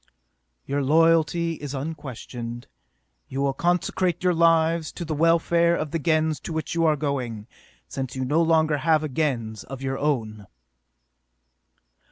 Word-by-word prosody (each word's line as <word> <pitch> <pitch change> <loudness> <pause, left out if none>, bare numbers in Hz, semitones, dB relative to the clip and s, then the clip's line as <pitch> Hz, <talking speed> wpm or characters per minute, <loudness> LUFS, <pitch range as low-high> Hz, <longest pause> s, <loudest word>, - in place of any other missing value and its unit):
"Your 140 +1 -1
loyalty 165 +2 +3
is 145 -1 -5
unquestioned. 125 -5 -6 0.6
You 135 - -5
will 140 -1 +1
consecrate 175 +2 0
your 180 -1 +3
lives 165 -1 +3
to 170 - -6
the 155 - -3
welfare 170 +2 +3
of 155 - -3
the 165 - -1
Gens 155 0 +1
to - - -7
which 160 0 -3
you 165 0 +1
are 155 - +3
going, 130 -7 -3 0.4
since 130 -2 -5
you 130 0 -2
no 150 +6 +2
longer 160 -2 +3
have 155 +2 +2
a - - -1
Gens 120 -7 -2
of 135 0 -8
your 135 0 -2
own!" 110 -8 -2
155 Hz, 150 wpm, -24 LUFS, 135-165 Hz, 0.6 s, loyalty